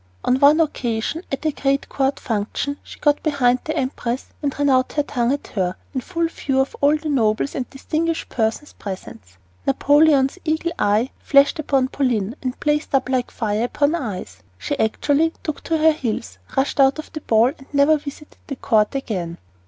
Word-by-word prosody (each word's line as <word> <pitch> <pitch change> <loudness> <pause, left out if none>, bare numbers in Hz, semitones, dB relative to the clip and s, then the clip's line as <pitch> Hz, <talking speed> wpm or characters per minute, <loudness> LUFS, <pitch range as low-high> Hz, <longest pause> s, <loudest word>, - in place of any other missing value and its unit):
On 255 - +2
one 290 +3 +6
occasion, 255 -1 -1
at 275 +3 -4
a 310 - +3
great 275 0 0
court 270 0 0
function, 230 +6 -2
she - - -12
got 295 -1 +2
behind 255 -5 +2
the 315 +1 -3
empress 255 -2 -2
and 285 -2 -2
ran 285 0 +1
out 255 -1 +2
her 295 - +1
tongue 245 -4 0
at 285 - -2
her, 185 -3 -1 0.2
in 260 - -1
full 335 +2 -1
view 270 -4 -2
of 265 - 0
all 290 +2 +4
the 310 - -7
nobles 235 -2 +1
and 255 - -4
distinguished 320 +4 -2
persons 225 +6 -2
present. 190 - -7 0.5
Napoleon's 290 - +4
eagle 320 +1 0
eye 215 +6 +2
flashed 280 +3 +4
upon 270 -3 +1
Pauline 240 -6 0
and 255 -1 -4
blazed 300 0 0 0.2
like 255 -2 0
fire 215 0 -1
upon 285 +4 +1
ice. 190 - -5 0.2
She 285 - -3
actually 290 +8 +2
took 310 - -4
to 325 - +1
her 320 +1 +5
heels, 215 - -4 0.2
rushed 270 +2 0
out 270 +1 +5
of 310 - -8
the 310 - -5
ball, 225 0 +4
and 270 - -17
never 290 +2 +4
visited 295 +1 -10
the 275 - -4
court 215 -2 +1
again. 180 -10 -3
275 Hz, 185 wpm, -21 LUFS, 235-295 Hz, 0.5 s, one